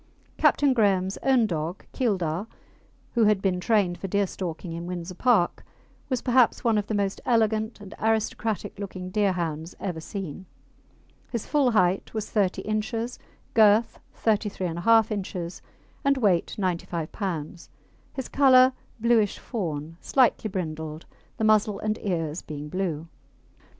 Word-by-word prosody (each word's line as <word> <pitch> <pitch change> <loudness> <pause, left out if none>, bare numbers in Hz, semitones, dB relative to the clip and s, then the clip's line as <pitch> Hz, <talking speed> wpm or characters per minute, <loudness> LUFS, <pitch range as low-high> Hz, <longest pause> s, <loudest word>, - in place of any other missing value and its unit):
Captain 285 -2 +4
Graham's 195 -5 +2
own 260 -4 +4
dog 170 -1 -3
Keildar, 195 - -1 0.7
who 230 -2 +4
had 210 -2 +4
been 190 -2 0
trained 185 -3 +1
for 195 - -4
deerstalking 185 -3 -2
in 170 +1 -5
Windsor 180 0 -5
Park, 205 -2 +2 0.5
was 255 -3 -1
perhaps 250 -2 +3
one 225 -3 +3
of 205 - -4
the 215 - -1
most 200 -1 -1
elegant 220 -2 +1
and 200 -1 -10
aristocratic 220 -1 -1
looking 185 -2 -6
Deerhounds 175 -5 -1
ever 175 -5 -4
seen. 190 -1 -6 0.8
His 235 -4 -3
full 285 -4 +2
height 190 -2 +1
was 215 -1 -3
30 200 -4 +1
inches, 225 +3 -2 0.3
girth 220 +1 +4 0.2
33 210 -3 0
1/2 220 +7 +3
inches, 185 -4 -4 0.4
and 275 0 +3
weight, 200 -9 +2
95 170 -4 -2
lbs., 170 -4 -5 0.4
his 265 -3 -5
colour 260 -2 +6 0.3
bluish 225 -3 +3
fawn, 165 - -4
slightly 250 -4 +2
brindled, 160 -4 -5 0.3
the - - -2
muzzle 215 -1 +3
and 215 +1 -2
ears 165 -4 -2
being 150 -1 -7
blue. 170 -3 -2
200 Hz, 135 wpm, -26 LUFS, 175-225 Hz, 0.8 s, colour